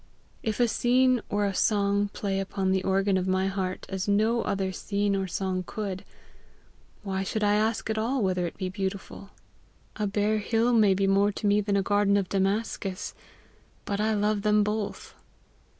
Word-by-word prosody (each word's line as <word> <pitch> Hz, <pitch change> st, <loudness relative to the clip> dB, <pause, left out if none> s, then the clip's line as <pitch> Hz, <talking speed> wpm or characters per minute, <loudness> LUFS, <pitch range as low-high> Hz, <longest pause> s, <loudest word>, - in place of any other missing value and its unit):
If 220 Hz, 0 st, -2 dB
a 240 Hz, -, +4 dB
scene 250 Hz, +1 st, +3 dB
or 205 Hz, 0 st, +1 dB
a 200 Hz, -, -1 dB
song 200 Hz, 0 st, +2 dB
play 200 Hz, -1 st, -3 dB
upon 195 Hz, 0 st, -1 dB
the 190 Hz, 0 st, +1 dB
organ 195 Hz, 0 st, +2 dB
of 185 Hz, 0 st, -1 dB
my 190 Hz, 0 st, +1 dB
heart 190 Hz, -1 st, -3 dB
as 190 Hz, 0 st, -4 dB
no 220 Hz, +3 st, +2 dB
other 195 Hz, -2 st, -1 dB
scene 200 Hz, +1 st, -1 dB
or 195 Hz, -1 st, -1 dB
song 185 Hz, 0 st, -2 dB
could, 195 Hz, -3 st, -4 dB, 1.0 s
why 190 Hz, -2 st, -2 dB
should 210 Hz, +3 st, -2 dB
I 205 Hz, 0 st, +3 dB
ask 220 Hz, +2 st, 0 dB
at 220 Hz, 0 st, -1 dB
all 240 Hz, +2 st, 0 dB
whether 180 Hz, -2 st, 0 dB
it -, -, -9 dB
be 185 Hz, -, -3 dB
beautiful? 195 Hz, 0 st, -5 dB, 0.7 s
A 210 Hz, -, 0 dB
bare 210 Hz, +2 st, +1 dB
hill 230 Hz, +3 st, +1 dB
may 210 Hz, -4 st, +5 dB
be 195 Hz, +1 st, +1 dB
more 200 Hz, +1 st, +3 dB
to 210 Hz, -, -5 dB
me 205 Hz, 0 st, +4 dB
than 200 Hz, -1 st, 0 dB
a 195 Hz, -, +1 dB
garden 205 Hz, 0 st, +3 dB
of 195 Hz, -3 st, -1 dB
Damascus, 195 Hz, 0 st, -1 dB, 0.7 s
but 200 Hz, 0 st, -2 dB
I 220 Hz, 0 st, +1 dB
love 210 Hz, 0 st, +1 dB
them 210 Hz, 0 st, +3 dB
both. 210 Hz, 0 st, -3 dB
200 Hz, 180 wpm, -27 LUFS, 195-215 Hz, 1.0 s, may